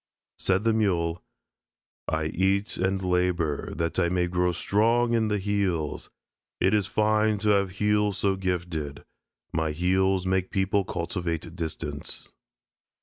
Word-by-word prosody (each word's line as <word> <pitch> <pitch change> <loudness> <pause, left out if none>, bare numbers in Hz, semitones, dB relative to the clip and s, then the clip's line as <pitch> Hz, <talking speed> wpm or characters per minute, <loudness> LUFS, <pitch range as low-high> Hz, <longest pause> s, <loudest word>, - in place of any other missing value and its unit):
Said 95 +1 +1
the 115 0 +3
Mule: 85 -6 +1 0.9
"I 80 0 0
eat 95 +5 0
and 95 +1 0
labor 90 -4 0
that 85 +1 -1
I 85 - +2
may 90 0 +1
grow 90 0 +1
strong 115 +7 +2
in 115 -1 +2
the 105 -1 +1
heels. 95 -6 -1 0.5
It 95 - +3
is 105 -2 +2
fine 110 0 +2
to 105 +1 0
have 100 -2 +3
heels 105 -1 +2
so 100 -1 +1
gifted. 85 -6 -3 0.5
My 80 -1 0
heels 95 +3 +2
make 95 0 0
people 95 0 +1
cultivate 85 -1 -3
distance." 80 -3 -5
95 Hz, 135 wpm, -26 LUFS, 85-100 Hz, 0.9 s, the